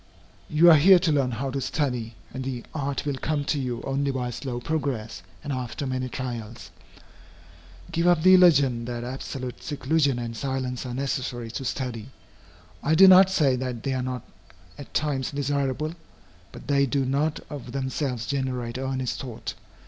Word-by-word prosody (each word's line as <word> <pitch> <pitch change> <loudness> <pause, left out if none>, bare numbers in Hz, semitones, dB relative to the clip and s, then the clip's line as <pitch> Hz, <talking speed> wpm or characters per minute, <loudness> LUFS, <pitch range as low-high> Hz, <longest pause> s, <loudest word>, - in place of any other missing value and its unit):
You 165 +3 +7
are 160 - +8
here 185 +6 +8
to 170 -2 +1
learn 140 -4 +2
how 130 +3 -3
to 135 +1 -2
study, 125 -6 -2 0.2
and 130 - -4
the 130 -2 -4
art 140 -2 -2
will 140 -2 -1
come 150 -2 -1
to 150 - 0
you 125 -3 -3
only 140 +1 -1
by 125 -2 -2
slow 120 0 -4
progress, 125 - -3 0.2
and 145 -2 -3
after 125 +2 -4
many 130 -1 -2
trials. 120 -3 -6 1.2
Give 170 +1 +1
up 175 -3 +4
the 185 +1 +8
illusion 140 -10 +5
that 120 0 -4
absolute 130 0 -6
seclusion 140 -1 +1
and 120 -1 -4
silence 130 -1 -3
are 120 - -5
necessary 125 -3 -3
to 135 - -5
study. 125 -3 -4 0.7
I 155 +2 +2
do 190 +4 +9
not 190 0 +8
say 150 -8 +3
that 125 -3 -4
they 135 - -1
are 130 - -1
not 125 -2 -4 0.5
at 145 - -11
times 140 -4 0
desirable. 140 +1 -1 0.6
But - - -11
they 140 -1 +3
do 135 +1 0
not 150 +4 0
of 135 -4 -7
themselves 130 -2 -2
generate 130 -3 -2
earnest 130 -1 -2
thought. 125 -4 -6
135 Hz, 170 wpm, -25 LUFS, 125-145 Hz, 1.2 s, do